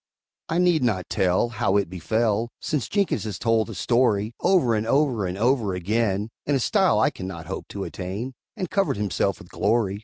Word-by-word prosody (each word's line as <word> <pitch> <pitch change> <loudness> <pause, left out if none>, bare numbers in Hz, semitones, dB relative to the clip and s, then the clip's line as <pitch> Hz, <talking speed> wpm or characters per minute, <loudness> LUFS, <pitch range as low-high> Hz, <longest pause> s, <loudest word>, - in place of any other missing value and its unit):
I 165 - 0
need 175 -3 +3
not 105 -8 0
tell 95 +5 +2
How 110 -4 +1
it 100 - +1
befell, 110 +6 0
(Since 150 -6 -2
Jenkins 200 -2 0
has 105 -4 -4
told 115 -1 +1
the 110 - -7
story 120 -3 +1
Over 170 -12 +3
and 110 0 -1
over 130 -7 +2
and 90 +1 -4
over 115 -4 +1
again 105 +2 0 0.2
In 145 - +2
a - - +2
style 190 - +3
I 110 - +3
can 95 - -7
not 85 -3 -7
hope 95 +4 -6
to 100 - -5
attain, 100 +9 -5 0.2
And 185 -3 -2
covered 195 - +1
himself 100 -2 0
with - - -14
glory!) 100 -2 0
110 Hz, 195 wpm, -24 LUFS, 100-130 Hz, 0.2 s, need